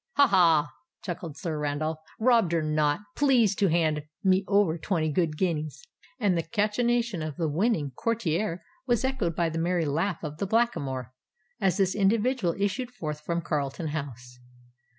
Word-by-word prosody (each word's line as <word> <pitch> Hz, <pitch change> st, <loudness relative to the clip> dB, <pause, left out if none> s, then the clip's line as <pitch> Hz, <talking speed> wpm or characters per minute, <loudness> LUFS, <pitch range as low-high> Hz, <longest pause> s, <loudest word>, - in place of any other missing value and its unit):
"Ha! 285 Hz, -, +6 dB
ha!" 165 Hz, -, +4 dB, 0.3 s
chuckled 170 Hz, -4 st, -6 dB
Sir 160 Hz, -2 st, -3 dB
Randolph: 150 Hz, +2 st, -2 dB, 0.2 s
"robbed 225 Hz, -7 st, +3 dB
or 165 Hz, -, +1 dB
not—please 205 Hz, -, +2 dB
to 200 Hz, -, +3 dB
hand 160 Hz, -3 st, +1 dB, 0.2 s
me 190 Hz, 0 st, +3 dB
over 200 Hz, -5 st, +3 dB
twenty 160 Hz, -3 st, 0 dB
good 155 Hz, -1 st, 0 dB
guineas." 155 Hz, -, -2 dB, 0.4 s
And 205 Hz, -6 st, +2 dB
the 165 Hz, -, +1 dB
cachinnation 225 Hz, +2 st, 0 dB
of 155 Hz, -2 st, -4 dB
the 165 Hz, -, 0 dB
winning 160 Hz, -, 0 dB
courtier 180 Hz, -, -1 dB, 0.2 s
was 240 Hz, 0 st, +2 dB
echoed 245 Hz, -12 st, -1 dB
by 170 Hz, -1 st, +1 dB
the 165 Hz, 0 st, -3 dB
merry 170 Hz, 0 st, +1 dB
laugh 165 Hz, +7 st, -1 dB
of 150 Hz, -1 st, -5 dB
the 200 Hz, -, -1 dB
Blackamoor, 140 Hz, -, 0 dB, 0.5 s
as 190 Hz, -3 st, +1 dB
this 190 Hz, -2 st, +2 dB
individual 210 Hz, -1 st, +1 dB
issued 200 Hz, +5 st, -1 dB
forth 155 Hz, -11 st, -6 dB
from 170 Hz, +2 st, -2 dB
Carlton 150 Hz, 0 st, -2 dB
House. 125 Hz, -5 st, -6 dB
170 Hz, 155 wpm, -27 LUFS, 155-210 Hz, 0.5 s, Ha